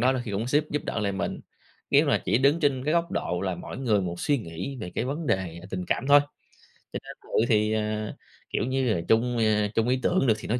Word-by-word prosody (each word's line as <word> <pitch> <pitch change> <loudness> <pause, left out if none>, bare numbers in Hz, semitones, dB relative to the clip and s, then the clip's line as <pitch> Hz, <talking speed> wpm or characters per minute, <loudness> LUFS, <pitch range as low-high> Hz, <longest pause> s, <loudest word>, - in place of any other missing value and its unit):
đó 130 +3 +4
đôi 130 -2 -2
khi 105 - -5
cũng 105 +4 -2
xếp 145 +4 +2
giúp 150 - -1
đỡ 115 - -2
lại 100 -2 0
mình. 95 - -3 0.5
Nếu - - +5
mà - - +2
chỉ - - +2
đứng 140 +5 +3
trên 135 -3 +1
cái 155 - +1
góc 170 0 +1
độ 90 - -2
là 95 -2 -1
mỗi 90 - -8
người 115 -6 +2
một 85 -2 -4
suy 145 -1 +2
nghĩ 95 +6 -6
về 90 - -5
cái - - -1
vấn 145 +5 -3
đề 95 -7 -1
là 90 - -11
tình 90 -1 -3
cảm 130 - -1
thôi, 145 0 +8 0.7
cho - - -2
nên - - -9
cự - - -19 0.2
thì, 105 -1 +3
ờ 110 0 -2 0.4
kiểu - - -1
như 130 -3 +1
là, 85 - -1
chung, 120 +2 +2
ơ, 105 -2 +2
chung 115 +1 +2
ý 130 +1 +2
tưởng 175 -7 +2
được 110 - +6
thì - - -8
nói 120 +3 0
115 Hz, 265 wpm, -26 LUFS, 100-135 Hz, 0.7 s, thôi